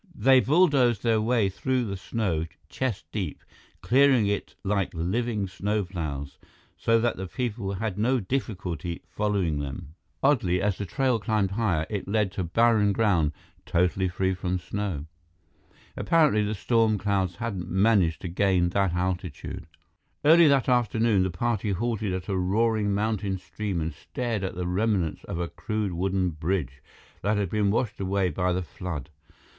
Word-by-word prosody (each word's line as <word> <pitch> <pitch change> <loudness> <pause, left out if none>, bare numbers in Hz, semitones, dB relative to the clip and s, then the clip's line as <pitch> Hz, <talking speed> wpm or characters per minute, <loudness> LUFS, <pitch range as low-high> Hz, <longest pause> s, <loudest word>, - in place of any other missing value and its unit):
They 135 -2 +5
bulldozed 135 - +3
their 115 -2 +3
way 115 -2 +2
through 125 +6 -1
the 100 -2 -3
snow, 95 -5 -2 0.2
chest 120 -6 -3
deep, 95 -8 -4 0.4
clearing 130 -3 +4
it 100 0 -2
like 100 -1 0
living 105 +5 -1
snowplows, 90 -8 -3 0.4
so 115 0 +2
that 120 0 0
the 95 0 -4
people 110 -3 -3
had 105 0 -3
no 125 +4 +2
difficulty 90 - -3
following 100 -8 0
them. 70 +1 -6 0.3
Oddly, 105 -11 +3
as 100 -1 0
the 100 - -3
trail 130 +4 +1
climbed 105 -3 0
higher, 95 -7 0
it 105 -3 -4
led 105 -1 +1
to 95 - -3
barren 105 +2 +3
ground, 95 -9 +2 0.3
totally 90 +2 +1
free 95 +1 0
from 90 0 -2
snow. 90 -4 -4 0.9
Apparently, 155 -11 +3
the 105 +1 -1
storm 110 0 +2
clouds 95 -3 0
hadn't 95 -6 -4
managed 95 -3 +3
to - - -4
gain 90 0 +2
that 95 -1 +1
altitude. 90 -3 -3 0.6
Early 165 +2 +7
that 140 -3 +3
afternoon, 115 -4 +2
the 95 - +1
party 105 +2 -1
halted 110 0 -1
at 90 0 -4
a 100 - -1
roaring 105 +3 +1
mountain 100 -1 -1
stream 100 -1 -4
and 80 0 -3
stared 115 +6 -4
at 95 -1 -3
the 90 0 -3
remnants 90 -2 0
of 85 - -4
a 85 - -1
crude 95 +4 -3
wooden 95 +1 0
bridge 75 -4 -2 0.4
that 105 +2 +1
had 100 -4 -1
been 105 -2 +2
washed 110 +1 -1
away 95 -1 0
by 90 +3 0
the 90 +1 -1
flood. 80 -4 -6
100 Hz, 155 wpm, -26 LUFS, 90-115 Hz, 0.9 s, Early